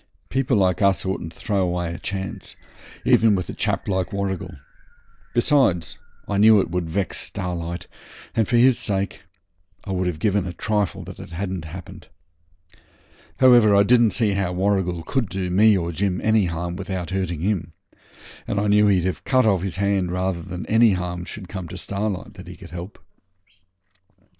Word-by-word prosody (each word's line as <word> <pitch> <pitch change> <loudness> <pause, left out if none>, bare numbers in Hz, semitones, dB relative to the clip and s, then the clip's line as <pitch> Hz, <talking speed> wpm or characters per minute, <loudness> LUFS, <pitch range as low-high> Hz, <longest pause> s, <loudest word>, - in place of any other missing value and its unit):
People 130 -3 +1
like 95 -2 +2
us 100 -3 +2
oughtn't 95 -3 -3
to - - -17
throw 100 -2 -1
away 90 -2 -1
a - - -7
chance, 95 0 -5 0.5
even 110 -2 +5
with 90 -2 -2
a - - -4
chap - - -2
like 95 -1 -1
Warrigal. 100 -2 -3 0.8
Besides, 120 - +2 0.3
I 100 -1 0
knew 110 0 +7
it 95 - -1
would 90 -2 -2
vex 95 +3 -2
Starlight, 85 -2 -4 0.5
and 110 -3 +1
for 120 - +2
his 125 +1 +5
sake 100 -1 -2 0.6
I - - -6
would 95 -1 0
have 90 -3 -2
given 100 +1 0
a 90 - -5
trifle 105 +1 -2
it - - -9
hadn't 90 0 -5
happened. 85 +3 -10 1.3
However, 120 -5 +6
I 100 - +6
didn't 120 +1 +5
see 110 -1 +1
how 100 -2 -1
Warrigal 90 -3 0
could 115 +3 -1
do 95 -1 -3
me 105 +2 +5
or 85 -1 -2
Jim 90 +1 -1
any 110 -2 +3
harm 85 +1 -4
without 95 -2 -4
hurting 90 -4 -2
him, 90 -4 -1 0.7
and 100 - -1
I 105 - 0
knew 105 0 +4
he'd 95 -3 +3
have 95 - -2
cut 130 -2 +3
off 100 -5 +3
his 95 -2 -3
hand 100 -2 0
rather 90 -1 -1
than 90 +2 -6
any 110 -1 +4
harm 90 -1 -3
should 95 -1 -7
come 95 -2 -6
to - - -8
Starlight 100 -1 -3
that - - -12
he - - -9
could - - -12
help. 90 +3 -8
95 Hz, 175 wpm, -23 LUFS, 90-105 Hz, 1.3 s, knew